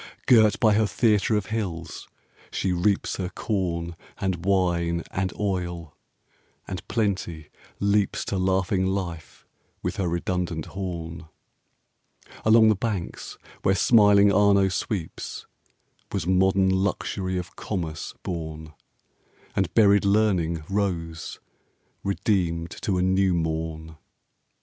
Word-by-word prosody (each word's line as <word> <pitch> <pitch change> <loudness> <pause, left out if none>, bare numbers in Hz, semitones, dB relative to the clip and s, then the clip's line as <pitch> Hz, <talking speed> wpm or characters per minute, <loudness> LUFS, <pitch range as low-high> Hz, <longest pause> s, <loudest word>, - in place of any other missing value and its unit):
Girt 110 -4 +5
by 110 -2 +4
her 110 0 +3
theatre 105 -1 +2
of 105 - -2
hills, 90 -7 -4 0.4
she 95 -1 -1
reaps 95 +3 0
Her 90 -2 -3
corn, 85 -5 -2 0.2
and 90 -3 -2
wine, 85 -3 +1
and 95 0 -1
oil, 85 -5 -3 0.7
and 95 -2 -4
Plenty 95 -8 -2 0.3
leaps 100 0 +1
5 - - -4
To 100 - -2
laughing 95 0 +1
life, 90 -4 -4 0.4
with - - -2
her 95 - 0
redundant 85 -1 -2
horn. 85 -4 -6 1.2
Along 110 0 +6
the 110 - +4
banks 100 -4 -4 0.2
where 95 - +3
smiling 100 -1 +5
Arno 100 -1 +4
sweeps 95 -1 -4 0.7
Was 95 -5 -2
modern 95 +1 +3
Luxury 95 -1 -1
of 90 0 -6
Commerce 85 -6 -4
born, 80 -2 -5 0.8
And 95 -4 0
buried 100 -3 +5
Learning 95 -6 +2
rose, 85 -5 -2 0.6
redeemed 90 -4 0
to 95 -3 0
a 90 - +1
new 95 0 +2
morn. 80 -1 -3
95 Hz, 115 wpm, -25 LUFS, 85-100 Hz, 1.2 s, Along